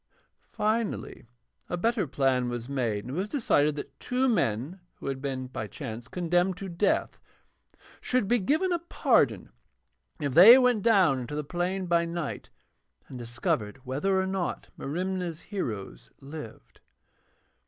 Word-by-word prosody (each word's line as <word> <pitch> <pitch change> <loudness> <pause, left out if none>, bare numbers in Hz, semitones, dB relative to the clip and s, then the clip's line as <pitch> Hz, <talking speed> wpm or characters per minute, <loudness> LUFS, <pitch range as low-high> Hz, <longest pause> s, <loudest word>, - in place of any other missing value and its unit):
Finally, 215 - -2 0.4
a 175 - -2
better 225 -1 +1
plan 130 -2 +1
was 120 -1 -5
made, 120 -7 -1
and 125 - -6
it - - -1
was 200 +3 -2
decided 150 - +2
that 145 - -8
two 255 +1 0
men 165 - 0 0.2
who - - -12
had 135 -1 -3
been 135 -2 -3
by 120 -4 -5
chance 120 0 -7
condemned 175 +2 0
to 195 - -6
death 185 +3 0 0.8
should 250 -5 0
be 240 +3 +3
given 310 - +1
a 345 - +1
pardon 340 - +1 0.7
if 145 -4 -2
they 200 - +10
went 250 -4 +3
down 190 - +4
into 125 +4 -5
the 150 - -2
plain 180 +4 -2
by 170 -1 +2
night 170 -2 -4 0.6
and 130 - -8
discovered 120 0 -3
whether 170 +10 0
or 190 - +1
not 190 -2 -3
Merimna's 180 +2 -3
heroes 125 - -5
lived. 140 -4 -10
170 Hz, 145 wpm, -28 LUFS, 130-195 Hz, 0.8 s, they